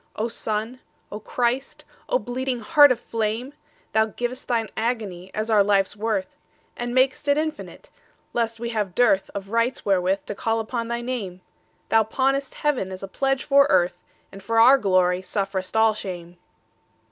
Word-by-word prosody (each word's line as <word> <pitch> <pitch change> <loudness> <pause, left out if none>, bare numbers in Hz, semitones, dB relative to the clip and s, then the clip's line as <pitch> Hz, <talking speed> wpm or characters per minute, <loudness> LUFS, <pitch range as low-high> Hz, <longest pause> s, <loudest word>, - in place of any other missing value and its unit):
O 225 +2 -2
Sun, 225 +2 -3 0.3
O 210 - -5
Christ, 245 +4 -2 0.2
O - - +3
bleeding 255 - -3
Heart 295 -3 +6
of 245 - 0
flame! 230 +4 -3 0.4
Thou 220 0 +3
giv'st 245 +3 -5
Thine 230 -3 0
agony 215 -6 -3
as 215 +1 -2
our 210 -2 +5
life's 195 -1 +2
worth, 210 -3 -2 0.4
And 240 0 -4
mak'st 260 +2 +2
it 285 0 +3
infinite, 310 0 -5 0.4
lest 230 -1 -1
we 235 0 -3
have 210 -6 -2
dearthOf 200 -4 +1
rights 230 +2 0
wherewith 190 0 +1
to - - -5
call 225 +3 -1
upon 230 +1 -3
thy 235 0 -3
Name; 215 -8 -5 0.5
Thou 225 - +5
pawnest 270 +5 -1
Heaven 270 -11 -1
as 185 +1 -8
a - - -4
pledge 270 +6 -1
for 280 -1 +5
Earth, 175 0 +2 0.3
And 195 - -11
for 225 +4 0
our 260 +4 +7
glory 185 -3 +2
sufferest 195 +1 -3
all 220 0 +5
shame. 175 -4 -7
225 Hz, 165 wpm, -24 LUFS, 195-250 Hz, 0.5 s, our